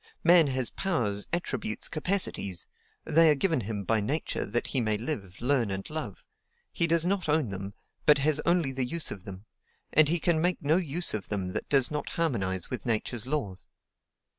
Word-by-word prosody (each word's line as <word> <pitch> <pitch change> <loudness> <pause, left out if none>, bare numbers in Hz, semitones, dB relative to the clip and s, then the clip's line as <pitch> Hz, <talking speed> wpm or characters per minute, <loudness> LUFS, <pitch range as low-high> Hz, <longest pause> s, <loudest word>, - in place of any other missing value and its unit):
Man 170 -2 +6
has 130 -2 +1
powers, 110 - -1
attributes, 175 +5 -2
capacities; 155 - -1 0.4
they 165 +1 +5
are 150 - +5
given 160 -2 +1
him 105 -1 -4
by 110 +2 +1
Nature 140 +10 -2
that 120 +4 -1
he 130 - 0
may 110 -2 +1
live, 105 - -4
learn, 125 -3 +1
and 95 0 -4
love: 155 0 -5 0.5
he 170 - +1
does 165 0 +2
not 185 -3 0
own 150 -6 +2
them, 100 +1 -6 0.3
but 150 - +7
has 150 +1 +1
only 170 -5 +2
the 130 0 -2
use 165 +3 -2
of 95 -2 -8
them; 95 +1 -9 0.5
and 155 -1 +5
he 170 +1 +2
can 160 -1 +1
make 180 +1 +1
no 150 +4 +2
use 175 -1 -1
of 105 -3 -4
them 95 -3 -2
that - - -4
does 135 -2 +3
not 150 -1 -3
harmonize 95 - -1
with 125 -5 -5
Nature's 115 0 -2
laws. 105 - -3
135 Hz, 190 wpm, -28 LUFS, 105-165 Hz, 0.5 s, but